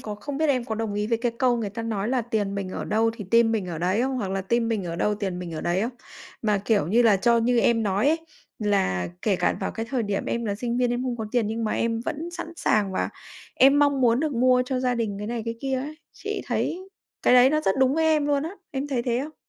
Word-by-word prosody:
còn 210 -1 -6
không 275 +6 -5
biết 315 -1 +2
em 255 -4 +1
có 220 - -3
đồng 220 -2 -3
ý 210 0 -1
với 230 0 0
cái 240 0 -1
câu 250 -2 +3
người 215 -4 -3
ta 230 +3 -5
nói 220 -2 -2
là 255 -1 +1
"Tiền 210 -3 -2
mình 195 -2 -3
ở - - -5
đâu 225 +1 +2
thì 210 - -6
tim 230 -1 +4
mình 210 -4 -1
ở 170 -3 -5
đấy" 185 +7 +1
không? 265 0 -1
Hoặc 200 -6 -3
là 195 0 -1
"Tim 230 +4 0
mình 215 -5 -1
ở 170 -1 -4
đâu 210 +4 +1
tiền 195 -4 -3
mình 175 -2 -6
ở - - -4
đấy" 175 +2 0
không? 235 - -1 0.5
Mà, 210 -2 +2
kiểu 205 -9 +2
như 230 +7 +3
là, 220 -4 +5
cho 235 +5 +3
như 235 +1 +2
em 230 0 +3
nói 205 +4 +1
ấy, 325 +2 +2 0.4
là 195 - 0
kể 200 -4 +2
cả - - +1
vào 190 - -2
cái 225 0 -5
thời 255 -4 0
điểm 205 -1 -2
em 235 0 -2
là 205 -2 -1
sinh 235 +3 -3
viên 245 -1 +2
em 245 +1 -1
không 250 -2 -2
có 220 -2 -4
tiền 240 -4 +2
nhưng 225 +1 -2
mà 215 - -1
em 230 0 0
vẫn 325 +4 -4
sẵn 345 -1 -7
sàng 205 -7 +1
và - - -1 0.5
em 275 +2 +5
mong 285 -2 +3
muốn 240 +1 +3
được 310 -2 -1
mua 250 +1 +4
cho 255 -1 -1
gia 250 -1 +1
đình 220 -4 -2
cái 210 - -5
này, 235 -1 -3
cái 230 0 -3
kia 265 -1 -1
ấy. 290 +4 -5 0.2
Chị - - -5
thấy 370 +2 -2 0.3
cái - - +5
đấy 250 +1 +7
nó 305 +1 +2
rất 195 -10 +1
đúng 265 0 +3
với 320 0 +1
em 305 -2 +3
luôn 285 -1 +1
á. 325 - -4 0.2
Em 275 0 -3
thấy 255 -4 -1
thế 240 0 0
không? 310 +2 -8
230 Hz, 290 wpm, -25 LUFS, 205-255 Hz, 0.5 s, đấy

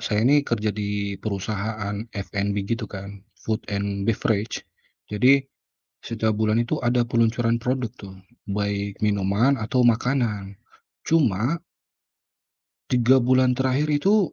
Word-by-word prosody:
saya 105 +1 0
ini 145 +3 +5
kerja 110 -6 -1
di 100 -1 -3
perusahaan 105 0 -3 0.2
F&B 100 +1 -2
gitu 115 -1 -3
kan, 100 0 -8 0.2
food 110 -1 -2
and 100 -1 -2
beverage 110 0 0 0.5
jadi, 130 +6 +4 0.6
setiap 110 -1 -1
bulan 110 +2 +1
itu 120 - -2
ada 120 0 +2
peluncuran 115 0 +1
produk 125 -1 -1
tuh, 95 -2 -10 0.3
baik 100 0 -2
minuman 105 +6 +2
atau 120 +3 +1
makanan. 115 -4 +1 0.5
Cuma 135 - +2 1.3
3 125 +1 +5
bulan 130 0 +3
terakhir 130 +3 +1
itu, 195 +6 +3
110 Hz, 115 wpm, -24 LUFS, 100-125 Hz, 1.3 s, ini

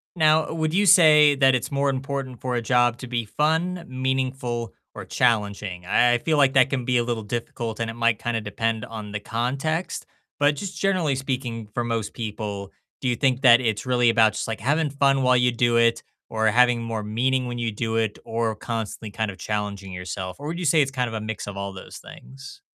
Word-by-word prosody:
Now, 155 -1 +3
would 160 0 -1
you 205 +2 +3
say 150 -5 +7
that 135 -1 +4
it's 125 - -3
more 140 0 +1
important 135 -1 -4
for 125 -1 -2
a 120 - 0
job 120 0 +2
to 125 - -8
be 120 -1 -2
fun, 165 +8 -1
meaningful, 130 -2 -2 0.2
or - - -8
challenging? 105 -6 -1
I 120 +5 +3
I - - +3
feel 155 +5 0
like 135 -2 +4
that 130 0 +5
can 130 -3 -2
be 125 0 +1
a 120 - +2
little 115 -2 -3
difficult, 115 0 -4
and 115 -1 -2
it - - -5
might 115 -2 +1
kinda 115 -2 -1
depend 110 +2 -2
on 105 -2 -7
the 105 - -2
context, 140 - -2 0.3
but 145 0 +3
just 195 +2 -6
generally 180 -8 +1
speaking 125 -4 -4
for 120 - -1
most 115 -3 -2
people, 105 -3 -5 0.3
do 130 - -3
you 120 - +1
think 130 +1 +1
that 120 -2 +7
it's 110 -2 -1
really 125 -2 +3
about 110 -2 +4
just, 110 - -4
like, 110 - -3
having 150 +3 +1
fun 140 -1 +2
while 125 0 +4
you 125 0 +3
do 120 0 +2
it? 115 0 +3 0.3
Or 110 0 0
having 120 +1 +4
more 115 -2 -4
meaning 125 +4 0
when 120 0 -5
you 115 -2 -2
do 110 +1 -3
it? 110 -2 0
Or 115 -1 -1
constantly 110 -1 -5
kind 110 -2 -2
of 95 - -13
challenging 100 -1 -4
yourself? 90 +1 -6
Or 145 - -6
would 170 +2 -4
you 175 - -3
say 155 +1 +4
it's 135 -1 0
kind 125 -2 -1
of 115 - -6
a 110 - -3
mix 110 -1 -5
of 100 -1 -7
all 100 0 -4
those 95 - -10
things? 135 - -12
120 Hz, 220 wpm, -24 LUFS, 110-135 Hz, 0.3 s, say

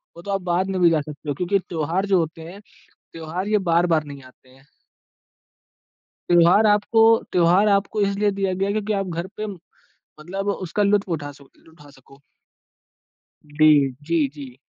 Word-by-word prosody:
वो 170 - -11
तो 200 - -6
आप 195 -1 -1
बाद 180 +1 -1
में 190 -1 -2
भी 170 - +6
जा 160 -2 +1
सकते 150 0 -9
हो, 145 - -2
क्योंकि 180 +6 0
त्योहार 170 +2 -3
जो 195 -2 +2
होते 165 0 -4
हैं, 200 +3 -13 0.5
त्योहार 165 +5 -5
ये 215 - +2
बार-बार 165 -2 +2
नहीं 140 -2 -11
आते 130 0 -20
हैं। 135 +2 -22 1.6
त्योहार 175 +5 +5
आपको 210 +2 +3 0.3
त्योहार 180 +4 +3
आपको 205 +2 -2
इसलिए 200 +1 +1
दिया 195 -1 -2
गया 190 +2 -2
है, 200 - -1
क्योंकि 215 0 -2
आप 195 -1 -2
घर 180 - -9
पे 215 - -4 0.5
मतलब 195 +6 -7 0.2
उसका 205 +5 -1
लुत्फ 200 -1 +1
उठा 145 -1 -8
सक 140 +2 -21
उठा 150 -2 -17
सको। 135 +1 -20 1.3
डी 155 +1 +3 0.4
जी, 160 -3 +1
जी। 135 -4 -10
175 Hz, 170 wpm, -22 LUFS, 155-200 Hz, 1.6 s, भी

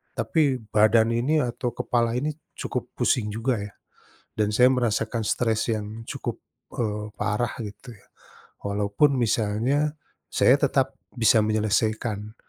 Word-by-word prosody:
tapi 140 -6 +1
badan 110 +2 +4
ini 140 +7 +2
atau 120 0 -3
kepala 115 -1 0
ini 145 +5 0 0.2
cukup - - -3
pusing 110 -4 +1
juga 115 +2 0
ya, 100 0 -7 0.6
dan 105 -1 +1
saya 125 +4 +5
merasakan 115 -1 0
stres 115 +1 0
yang 110 +1 -4
cukup, - - -5 0.3
eee, 105 -2 -2
parah 105 +3 -1
gitu 110 +3 -9
ya, 100 - -21 0.6
walaupun 100 +8 +1
misalnya, 120 +6 +1 0.4
saya - - +4
tetap - - +1 0.2
bisa 115 -1 +4
menyelesaikan. 110 0 0
115 Hz, 125 wpm, -25 LUFS, 105-125 Hz, 0.6 s, saya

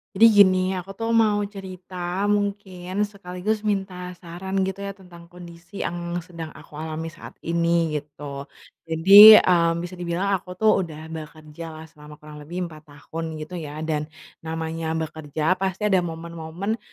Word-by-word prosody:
Jadi 215 +4 +7
gini, 185 -2 +7 0.2
aku 180 +2 -9
tuh 225 +2 -2
mau 215 -2 +3
cerita 185 -2 -10 0.4
mungkin 200 -2 -2
sekaligus 200 +1 -3
minta 185 -3 -3
saran 180 +2 -7
gitu 190 0 -3
ya, 200 0 -5
tentang 175 -3 -15
kondisi 175 +2 -9
yang 175 0 -4
sedang 165 -2 -8
aku - - -15
alami 160 +1 -5
saat 170 - -12
ini, 170 -1 +1
gitu. 140 -1 -9 0.4
Jadi, 195 +7 +10
mmm, 170 -3 +3
bisa 175 +1 -8
dibilang 175 +3 -1
aku 180 -1 -2
tuh 215 +3 +4
udah 160 -3 -6
bekerjalah 155 0 -9
selama 150 0 -13
kurang 150 0 -12
lebih 170 +5 -5
4 155 0 -14
tahun 160 +2 -7
gitu 160 +3 -6
ya, 155 0 -6
dan 150 -1 -2 0.3
namanya 160 0 -4
bekerja 160 +2 -2
pasti 190 +1 -2
ada 190 - +5
momen-momen 170 +5 -4
170 Hz, 150 wpm, -24 LUFS, 160-190 Hz, 0.4 s, Jadi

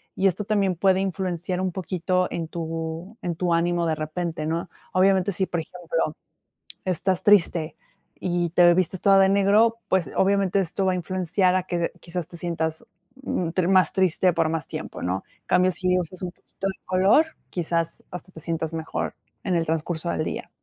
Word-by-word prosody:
y 195 - 0
esto 190 +3 -1
también 200 -4 +1
puede 190 +2 +3
influenciar 185 -1 -2
un 185 -1 0
poquito, 185 0 -1
en 165 -2 -3
tu 165 +5 -5
en 170 -2 -2
tu 175 0 0
ánimo 170 0 +1
de 160 - +1
repente, 155 0 -3
¿no? 165 +3 -2 0.3
Obviamente, 190 +1 +3
si, 190 +1 0
por 175 - -2
ejemplo, 165 -2 -3 0.7
estás 185 +1 0
triste, 170 -6 +3 0.4
y 175 -1 0
te 175 0 +6
vistes 185 0 0
toda 195 -1 +6
de 190 0 +6
negro, 205 +4 +4
pues, 180 -7 +1
obviamente, 195 0 +3
esto 190 +2 -1
va 185 - +3
a - - 0
influenciar 185 +1 +1
a 185 -1 +1
que 175 -2 -1
quizás 170 -1 -4
te 170 - -10
sientas, 160 -2 -2 0.4
mm, 175 -9 -1 0.2
más 185 -1 +4
triste 185 -1 +3
por 155 - +1
más 165 -1 -2
tiempo, - - -6
¿no? 90 +2 -1 0.2
En - - -51
cambio, 185 +1 +4
si 180 0 +1
usas 180 +1 -5
un 180 - -2
poquito 195 +1 -6
de 190 - -6
color, 190 - +4 0.2
quizás 165 -1 -2
hasta 180 +1 -8
te - - -11
sientas 165 0 -3
mejor, 160 -1 -3 0.3
en 185 -3 +1
el 165 - 0
transcurso 165 +1 -1
del - - -1
día. - - -5
180 Hz, 185 wpm, -24 LUFS, 165-190 Hz, 0.7 s, te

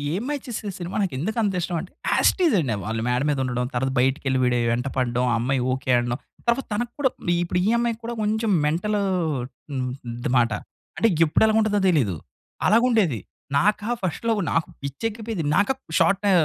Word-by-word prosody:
'ఏం 200 - -2
మాయ 295 -1 -1
చేసావే' 210 -4 -4
సినిమా 175 0 -5
నాకు 185 -9 -1
ఎందుకు 220 - -2
అంత 200 -3 0
ఇష్టం 175 0 -2
అంటే. 180 - -9 0.2
యాస్ - - +5
ఇట్ 370 - -4
ఇస్ 295 - +3
అండి 130 -9 0
వాళ్ళు 110 +1 -2
మేడ 125 +2 +1
మీద 145 -2 +1
ఉండడం, 125 -1 -1
తర్వాత 130 +2 0
బయటికెళ్లి 130 +1 +1
వీడే 125 -1 +2
వెంట 125 +3 -1
పడడం, 125 -1 +1
ఆ - - +2
అమ్మాయి 130 +2 0
ఓకె 130 0 -2
అనడం. 120 +1 -1 0.3
తర్వాత 235 +3 +2
తనకు 240 +3 -2
కూడా 265 -3 +2 0.3
ఇప్పుడు 180 - -1
ఈ - - +2
అమ్మాయి 235 -1 0
కూడా 235 +1 -3
కొంచెం 220 +1 0 0.2
మెంటల్ 180 +7 0 0.8
హ్మ్ 130 -1 -1 0.3
అది 120 - -2
మాట. 120 -2 +2 0.5
అంటే 230 - +4 0.2
ఎప్పుడు 155 - +3
ఎలాగుంటదో 215 -2 +2
తెలియదు, 125 - +2 0.5
అలాగా 230 +3 +5
ఉండేది. 175 - +2 0.4
నాకా 210 +5 +1
ఫస్ట్ 185 +5 -3
లవ్ 220 -3 +2
నాకు 165 +1 +1
పిచ్చి 140 +9 -6
ఎక్కిపోయేది. 220 -4 -4
నాకు 205 +6 +3
అప్ 265 - -30 0.2
షార్టు 200 0 +3
175 Hz, 195 wpm, -24 LUFS, -, 0.8 s, యాస్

